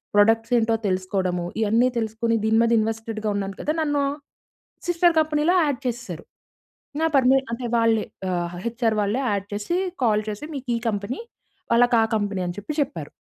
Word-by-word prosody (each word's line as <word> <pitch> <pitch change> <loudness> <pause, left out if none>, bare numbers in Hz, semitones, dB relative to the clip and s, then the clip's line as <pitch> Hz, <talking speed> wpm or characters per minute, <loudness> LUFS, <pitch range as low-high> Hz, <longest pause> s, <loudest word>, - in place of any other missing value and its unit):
Products 225 +3 +4
ఏంటో 225 0 +2
తెలుసుకోవడము, 185 -1 -1 0.2
ఇయన్నీ 230 +4 +3
తెలుసుకొని 225 +1 -1
దీని 220 0 +3
మీద 230 - +2
ఇన్వెస్టెడ్‌గా 220 0 -2
ఉన్నాను 195 -1 -3
కదా! 305 - 0
నన్ను 290 -2 +1 0.8
సిస్టర్ 350 -1 +3
కంపెనీలో 310 +3 +2
యాడ్ 285 -4 -1
చేసేసారు. 225 -9 -5 0.8
నా 325 - +3
పర్మి 265 0 +5 0.2
అంటే 240 +1 -4
వాళ్ళే 230 -1 +2 0.3
ఆహ్, 175 0 -2
హెచ్ఆర్ 230 -1 0
వాళ్ళే 210 +6 0
యాడ్ 200 -1 -2
చేసి 210 +13 -1 0.3
కాల్ 215 -2 +3
చేసి 210 +8 -5
"మీకు 270 -2 -6
ఈ - - -4
కంపెనీ", 205 +4 -3 0.5
వాళ్ళకి 240 0 +5
ఆ - - +3
కంపెనీ", 205 -2 -2
అని 175 - -4
చెప్పి 300 +9 -5
చెప్పారు. 160 - -4
225 Hz, 160 wpm, -24 LUFS, 205-250 Hz, 0.8 s, పర్మి